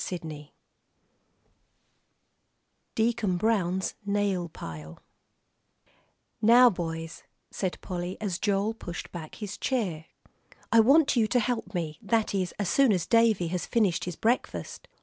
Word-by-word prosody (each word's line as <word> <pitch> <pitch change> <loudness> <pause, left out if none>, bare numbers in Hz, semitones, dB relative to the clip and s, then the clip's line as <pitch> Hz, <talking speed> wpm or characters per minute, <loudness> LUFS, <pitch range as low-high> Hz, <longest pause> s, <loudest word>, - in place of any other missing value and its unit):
III 155 -4 -7 2.4
DEACON 225 -5 +1
BROWN'S 190 -3 0
NAIL 200 -4 0
PILE 80 - -9 1.4
"Now, 240 +3 +7
boys," 165 -2 -5 0.3
said 185 -3 -3
Polly, 180 0 -4
as 195 -5 -3
Joel 205 +1 +1
pushed 175 -6 -7
back 160 -3 -8
his 205 -2 -7
chair, 190 - -1 0.7
"I 230 - +6
want 280 +6 +5
you 225 -3 +3
to 245 - +2
help 225 -4 -2
me, 160 -3 -3
that 225 0 0
is, 185 -2 -1
as 205 - -1
soon 270 +7 +4
as 180 -5 +1
Davie 225 -7 +3
has 180 0 -3
finished 210 -8 +1
his 180 -2 -4
breakfast." 235 +7 -2
195 Hz, 125 wpm, -28 LUFS, 175-225 Hz, 2.4 s, Now